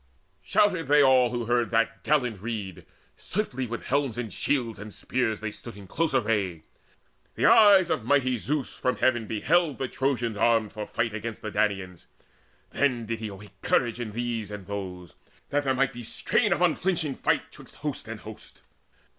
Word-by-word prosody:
Shouted 185 Hz, -5 st, +2 dB
they 145 Hz, +1 st, +6 dB
all 130 Hz, -2 st, +5 dB
who 120 Hz, -1 st, -3 dB
heard 120 Hz, 0 st, +1 dB
that 115 Hz, 0 st, 0 dB
gallant 125 Hz, -9 st, +1 dB
rede. 105 Hz, -5 st, -5 dB, 0.3 s
Swiftly 130 Hz, -, -3 dB
with 115 Hz, 0 st, -5 dB
helms 140 Hz, -3 st, 0 dB
and 115 Hz, -4 st, -4 dB
shields 120 Hz, -7 st, -1 dB
and 105 Hz, +1 st, -8 dB
spears 115 Hz, -1 st, -2 dB
they 110 Hz, -1 st, -3 dB
stood 115 Hz, 0 st, -10 dB
In 100 Hz, -, -11 dB
close 160 Hz, -, -1 dB
array. 105 Hz, -9 st, 0 dB, 0.7 s
The -, -, +1 dB
eyes 200 Hz, -4 st, +7 dB
of 115 Hz, -, 0 dB
mighty 130 Hz, -1 st, +2 dB
Zeus 145 Hz, +4 st, -2 dB
From 125 Hz, -, -1 dB
heaven 120 Hz, -3 st, +1 dB
beheld 150 Hz, +8 st, +1 dB
the 130 Hz, -, -2 dB
Trojans 120 Hz, -5 st, -1 dB
armed 115 Hz, -1 st, +2 dB
for 105 Hz, -2 st, -5 dB
fight 115 Hz, -1 st, -1 dB
Against 110 Hz, 0 st, -5 dB
the 110 Hz, -, -4 dB
Danaans: 95 Hz, -5 st, -1 dB, 0.6 s
then 125 Hz, -5 st, +1 dB
did 115 Hz, 0 st, -3 dB
he 110 Hz, -, -4 dB
awake 100 Hz, -1 st, -12 dB
Courage 120 Hz, -1 st, +1 dB
in 110 Hz, -3 st, -5 dB
these 115 Hz, -2 st, -3 dB
and 105 Hz, -2 st, -7 dB
those, 90 Hz, -4 st, -6 dB, 0.4 s
that 145 Hz, 0 st, 0 dB
there 130 Hz, -1 st, +2 dB
might 135 Hz, +1 st, +1 dB
be 120 Hz, -, -7 dB
Strain 195 Hz, -, 0 dB
of 175 Hz, -, +2 dB
unflinching 170 Hz, -3 st, +1 dB
fight -, -, 0 dB
'twixt -, -, -14 dB
host -, -, -4 dB
and -, -, -7 dB
host. -, -, -12 dB
120 Hz, 180 wpm, -27 LUFS, 105-135 Hz, 0.7 s, eyes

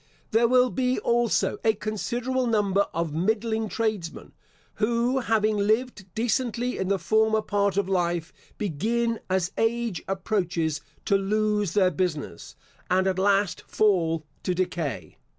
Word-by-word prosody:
There 230 Hz, +2 st, +4 dB
will 250 Hz, +1 st, +4 dB
be 255 Hz, -1 st, 0 dB
also 235 Hz, -1 st, +1 dB
a 220 Hz, -1 st, +3 dB
considerable 240 Hz, +5 st, -2 dB
number 200 Hz, -3 st, +2 dB
of 165 Hz, -2 st, -2 dB
middling 220 Hz, +5 st, 0 dB
tradesmen, 215 Hz, -8 st, -3 dB, 0.5 s
who 235 Hz, +4 st, +1 dB
having 220 Hz, -3 st, +1 dB
lived 215 Hz, 0 st, 0 dB
decently 240 Hz, +2 st, -1 dB
in 190 Hz, -, -1 dB
the 200 Hz, 0 st, +2 dB
former 220 Hz, +2 st, +2 dB
part 200 Hz, -1 st, 0 dB
of 200 Hz, -2 st, +1 dB
life, 175 Hz, -3 st, -1 dB, 0.2 s
begin, 225 Hz, +5 st, -1 dB
as 185 Hz, -1 st, 0 dB
age 225 Hz, -4 st, 0 dB
approaches, 180 Hz, -5 st, -1 dB, 0.2 s
to 200 Hz, -, +3 dB
lose 210 Hz, -1 st, 0 dB
their 185 Hz, -3 st, +4 dB
business, 155 Hz, -, -3 dB, 0.3 s
and 185 Hz, +1 st, +3 dB
at 190 Hz, -1 st, 0 dB
last 200 Hz, -1 st, +2 dB
fall 165 Hz, -7 st, +1 dB, 0.2 s
to 180 Hz, -, -1 dB
decay. 175 Hz, -5 st, -3 dB
210 Hz, 135 wpm, -26 LUFS, 185-230 Hz, 0.5 s, There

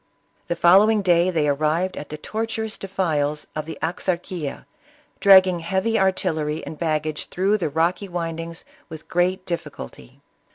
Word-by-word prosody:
The 170 Hz, -, -1 dB
following 200 Hz, +5 st, +5 dB
day 175 Hz, -1 st, +4 dB
they 160 Hz, -4 st, +1 dB
arrived 155 Hz, +6 st, 0 dB
at 145 Hz, -, -7 dB
the 150 Hz, -, -6 dB
tor 220 Hz, +8 st, -3 dB
tuous 220 Hz, -1 st, -5 dB
defiles 155 Hz, -6 st, -1 dB
of 155 Hz, 0 st, -4 dB
the 165 Hz, -, -6 dB
Axarquia, 175 Hz, -2 st, -3 dB, 0.5 s
dragging 190 Hz, -3 st, +6 dB
heavy 190 Hz, +7 st, 0 dB
artillery 160 Hz, -5 st, 0 dB
and 155 Hz, -, -8 dB
baggage 155 Hz, -2 st, -2 dB
through 195 Hz, +4 st, +1 dB
tfte 155 Hz, -5 st, -3 dB
rocky 175 Hz, +4 st, 0 dB
windings 165 Hz, -1 st, -5 dB, 0.2 s
with 160 Hz, -2 st, -10 dB
great 185 Hz, +2 st, 0 dB
difficulty. 150 Hz, -, -7 dB
170 Hz, 140 wpm, -23 LUFS, 155-190 Hz, 0.5 s, dragging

